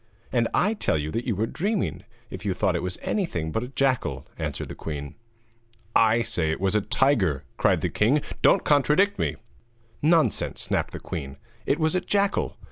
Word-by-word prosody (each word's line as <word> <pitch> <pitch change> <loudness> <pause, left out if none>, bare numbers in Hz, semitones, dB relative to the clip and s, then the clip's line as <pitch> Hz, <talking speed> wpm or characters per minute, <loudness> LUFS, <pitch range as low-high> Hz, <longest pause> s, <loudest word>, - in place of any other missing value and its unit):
'And 120 -2 +2
I 210 +4 +2
tell 210 - 0
you 75 +1 -3
that 115 +6 -2
you 115 - +1
were 105 +4 0
dreaming 200 - -2 0.3
if 95 - -7
you 100 -3 -1
thought 95 -4 +1
it 85 - -1
was 90 -1 -3
anything 85 - -1
but 110 - -1
a 125 - -4
jackal,' 135 -1 0
answered - - -4
the - - -5
queen. 75 -2 -6 0.8
'I 115 +1 +4
say 80 -7 -1
it 80 - -1
was 95 +1 +1
a 105 - +3
tiger,' 100 - +2
cried - - +3
the - - 0
king; 135 +8 +2 0.2
'don't - - +5
contradict 150 +8 +3
me.' - - 0 0.7
'Nonsense!' 160 +1 +2
snapped - - -1
the - - -5
queen. 70 -4 -6 0.3
'It 140 - +2
was 155 -1 +1
a 185 - +1
jackal.' 200 +1 0
115 Hz, 190 wpm, -25 LUFS, -, 0.8 s, don't